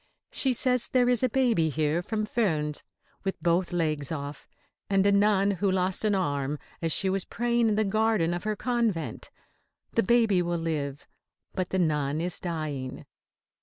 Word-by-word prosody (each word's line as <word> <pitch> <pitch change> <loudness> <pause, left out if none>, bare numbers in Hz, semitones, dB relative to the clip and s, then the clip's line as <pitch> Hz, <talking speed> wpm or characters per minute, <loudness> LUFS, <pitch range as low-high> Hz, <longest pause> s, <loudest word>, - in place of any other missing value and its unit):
She 265 - +2
says 250 0 +2
there 250 -1 +2
is 245 -2 +3
a 255 - +2
baby 230 -10 +2
here 155 +2 0
from 215 +3 -2
Furnes 160 -10 -1 0.4
with 195 -1 -3
both 175 +1 +1
legs 155 -5 -1
off, 145 -2 -6 0.4
and 195 -1 +3
a 200 - +5
nun 200 0 +3
who 200 +1 0
lost 185 +1 +1
an 210 -2 +3
arm 145 -5 -1 0.2
as 165 -1 0
she 190 - +1
was 190 0 0
praying 235 -1 +1
in 210 - +1
the 215 - +2
garden 215 -4 +1
of 175 - -4
her 215 0 -1
convent. 230 -8 -2 0.6
The 230 - +2
baby 225 -4 +3
will 175 0 -1
live, 150 -4 -3 0.5
but 185 -2 -2
the 190 - -1
nun 150 -4 +1
is 175 +1 -1
dying. 155 -7 -4
185 Hz, 170 wpm, -27 LUFS, 160-215 Hz, 0.6 s, a